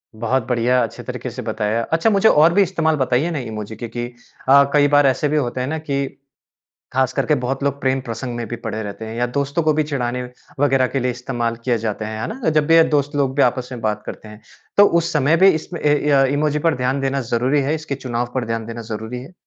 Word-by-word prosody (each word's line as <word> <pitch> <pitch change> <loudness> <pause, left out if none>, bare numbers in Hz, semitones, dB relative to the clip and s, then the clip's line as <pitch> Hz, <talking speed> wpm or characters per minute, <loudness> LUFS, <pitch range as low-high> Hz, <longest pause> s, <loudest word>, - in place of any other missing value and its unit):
बहुत 120 +2 -1
बढ़िया, 125 +1 +2
अच्छे 115 - -6
तरीके - - -5
से - - -7
बताया। 110 +1 -1
अच्छा 165 +7 +3
मुझे 205 +1 +4
और 160 +3 +5
भी 200 - +4
इस्तेमाल 165 -4 0
बताइए 130 +5 +1
ना 150 - -2
इमोजी 110 -2 -6
के 115 +2 -6
कि 120 +1 -4 0.4
अ, 140 +1 +8
कई 145 -1 +5
बार 145 0 +4
ऐसे 135 +3 +1
भी 155 - +1
होते 125 -2 -1
हैं 130 - -2
ना 160 +2 -2
कि 140 -3 -2 0.9
खास 130 0 +1
करके 150 - +1
बहुत 135 +1 -3
लोग 140 0 -1
प्रेम-प्रसंग 130 -2 -2
में 120 -1 -4
भी 120 - -4
पड़े 110 -1 -5
रहते 105 +1 -7
हैं 110 +1 -7
या 120 +1 +1
दोस्तों 140 +4 0
को 155 - +3
भी 155 - +2
चिढ़ाने 125 -4 -2 0.4
वग़ैरह 135 -2 +3
के 135 - -2
लिए 125 0 0
इस्तेमाल 120 -2 -3
किये 120 -3 +1
जाते 110 -1 -3
हैं, 110 0 -5
है - - -2
ना? 255 -8 -3
जब 155 -1 +2
भी 165 +1 +6
दोस्त 145 0 0
लोग 135 -2 +1
भी 140 - +4
आपस 125 0 +1
में 125 - -6
बात 105 -1 -2
करते 110 - -8
हैं। 105 +1 -12 0.4
तो 205 - +8 0.2
उस 170 +1 -3
समय 150 +2 +3
भी 190 +2 +6
इसमें 170 +1 -8
ए, 145 0 +3 0.2
य 135 -1 +5
इमोजी 150 0 +1
पर 160 - +2
ध्यान 130 +2 -1
देना 135 0 -1
ज़रूरी 130 +5 +2
है? 145 +4 0
इसके 155 -2 -4
चुनाव 120 -2 -3
पर 130 - -1
ध्यान 115 -1 -3
देना 115 0 -6
ज़रूरी 110 +3 -5
है? 145 +7 -12
130 Hz, 245 wpm, -20 LUFS, 120-145 Hz, 0.9 s, अ